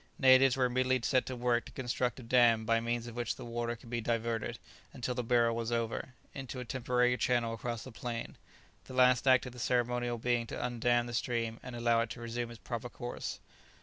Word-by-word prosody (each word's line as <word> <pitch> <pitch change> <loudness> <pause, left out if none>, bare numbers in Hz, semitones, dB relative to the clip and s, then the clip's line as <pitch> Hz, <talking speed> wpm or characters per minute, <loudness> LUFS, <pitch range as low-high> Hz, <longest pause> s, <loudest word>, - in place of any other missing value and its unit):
Natives 130 0 +6
were 130 - +3
immediately 130 0 +1
set 130 -3 +2
to 130 - -3
work 120 -1 +1
to - - -11
construct 125 -2 -2
a - - -9
dam 115 -2 +4
by 115 +1 +3
means 120 0 -2
of 120 -1 -8
which 120 0 -2
the - - -9
water 120 0 -3
should 120 -1 -14
be 120 -1 -1
diverted, 115 0 -1 0.4
until 125 +1 -3
the 125 0 -2
burial 115 -1 +3
was 115 0 -2
over, 115 +2 -2 0.2
into 135 -2 -6
a 125 - -5
temporary 125 0 +1
channel 120 -1 +1
across 115 0 -4
the 130 - -9
plain; 115 +1 -5 0.5
the 130 - -9
last 125 0 +4
act 130 -1 +6
in 125 - -6
the 125 - -11
ceremonial 120 0 0
being 120 0 0
to - - -6
undam 120 0 +1
the 120 - -7
stream 115 -1 -1
and 125 - -8
allow 115 -1 +2
it 115 - -2
to 120 - -7
resume 120 0 -4
its 120 - -10
proper 115 +4 -5
course. 120 0 -5
120 Hz, 215 wpm, -32 LUFS, 115-125 Hz, 0.5 s, Natives